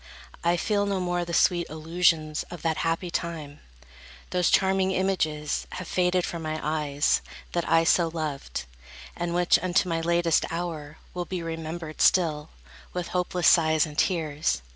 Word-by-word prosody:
I 175 +1 +2
feel 205 +2 0
no 200 -1 0
more 175 -1 -1
the 170 - -6
sweet 175 0 +3
illusions 160 -1 +1
of 175 - -9
That 160 -1 0
happy 165 +1 -1
time; 160 -4 -4 0.7
those 180 -2 +2
charming 190 0 +3
images 180 -6 -1
Have 180 -2 -6
faded 180 0 +1
from 170 - -5
my 155 0 -3
eyes, 150 -1 +1 0.3
that 175 -1 -2
I 165 - +5
so 170 +1 +3
loved, 150 - -4 0.5
And 175 0 -3
which, 175 0 +4
unto 185 +1 +1
my 165 -1 -1
latest 170 -1 +2
hour, 160 -3 -5 0.2
will 180 -1 -3
be 180 -2 -4
Remembered 165 -1 -5
still, 155 -4 +3 0.4
with 180 -1 -3
hopeless 180 -1 0
sighs 160 -2 +5
and 150 -1 -9
tears. 150 - 0
170 Hz, 155 wpm, -26 LUFS, 155-180 Hz, 0.7 s, I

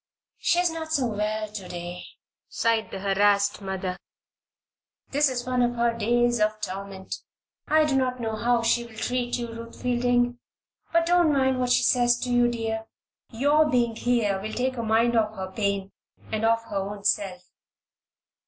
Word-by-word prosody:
"She 345 - +2
is 355 -1 +3
not 320 -1 -6
so 285 -5 +2
well 215 -1 -2
to 205 -3 -8
day," 175 0 -7 0.4
sighed 230 -1 0
the - - -6
harassed 200 +1 +2
mother. 190 -1 -3 1.1
"This 290 +1 +3
is 245 -2 -3
one 250 -1 0
of 240 0 +1
her 235 0 +2
days 240 +1 +2
of 215 0 +1
torment. 195 -1 -6 0.5
I 310 0 +4
do 290 -3 0
not 255 -1 0
know 225 -2 -2
how 235 +1 +1
she 235 +1 +2
will 225 - -15
treat 245 +2 -1
you, 240 -1 -4
Ruth 230 0 -10
Fielding; 245 0 +1 0.5
but 335 0 +3
don't 350 -2 +4
mind 265 -2 +2
what 250 -1 0
she - - +4
says 240 -1 +3
to 250 - -2
you, 245 0 +4
dear. 225 -1 -3 0.4
Your 290 +6 +3
being 240 -3 +1
here 220 -5 +1
will 215 +2 -5
take 260 +1 0
her 240 - -4
mind 225 +2 +2
off 220 -1 +1
her 190 -1 -5
pain 200 -1 -1 0.4
and 220 0 -2
off 230 0 +2
her 205 - -5
own 200 +1 -4
self." 195 -3 0
230 Hz, 175 wpm, -26 LUFS, 205-250 Hz, 1.1 s, I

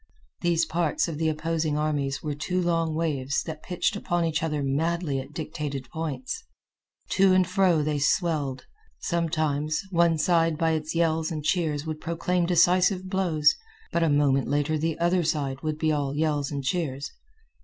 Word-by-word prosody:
These 170 -1 +2
parts 165 -2 0
of 160 -3 -5
the 160 -1 +2
opposing 155 -1 -1
armies 145 -3 -1
were 150 -2 -2
two 165 +6 -2
long 165 -2 0
waves 140 -4 -1
that 155 -1 -7
pitched 180 +3 -1
upon 175 -4 0
each 160 -1 0
other 150 -3 -1
madly 150 +1 0
at 135 +2 -8
dictated 150 -4 -5
points. 165 - -4 0.7
To 190 -1 +4
and 185 -1 +3
fro 180 -4 +3
they 150 -1 -1
swelled. 145 -3 0 0.3
Sometimes, 155 -3 -1
one 170 -2 +3
side 165 0 +2
by 165 0 +2
its 155 0 -2
yells 160 -1 +1
and 155 -2 -4
cheers 155 -3 0
would 155 -1 -5
proclaim 170 +1 0
decisive 180 +2 +3
blows, 165 -6 +3 0.4
but 170 - +1
a 165 - +3
moment 145 -2 +3
later 145 +2 +1
the 160 +1 -1
other 175 +2 +2
side 140 -4 -1
would 155 -1 -2
be 155 0 +1
all 145 -2 -1
yells 150 -2 0
and 140 -2 -4
cheers. 140 -3 -2
160 Hz, 165 wpm, -26 LUFS, 150-170 Hz, 0.7 s, To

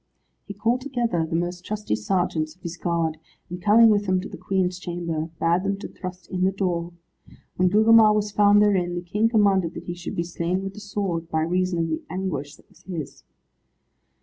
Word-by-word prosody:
He 200 - -7
called 230 +5 0
together 235 - -1
the 165 - -3
most 175 +1 -2
trusty 210 - -2
sergeants 155 - -1
of 185 - -33
his 170 -1 -5
guard, 165 -2 -1 0.3
and 180 0 -6
coming 225 +4 +6
with 205 -1 +1
them 185 0 +2
to - - -6
the - - -9
Queen's 185 -2 -1
chamber, 170 -3 -3
bade 170 +2 +2
them 195 0 -1
to 200 - -7
thrust 180 -1 -8
in 185 -1 -1
the 190 - +3
door. 175 -3 -2 0.6
When 185 0 +3
Gugemar 220 +2 +6
was 210 0 0
found 205 0 +5
therein, 180 -4 +1
the 175 - -4
King 210 +5 +1
commanded 195 -6 +2
that - - -7
he 175 - -5
should 175 0 -7
be 170 - 0
slain 175 +2 -2
with 195 0 -5
the 210 - -10
sword, 195 -5 -3
by 160 -1 0
reason 180 +2 0
of 165 -1 0
the 160 - -2
anguish 155 -6 -4
that - - -23
was 180 -3 -23
his. 170 -7 -7
185 Hz, 205 wpm, -24 LUFS, 170-205 Hz, 0.6 s, coming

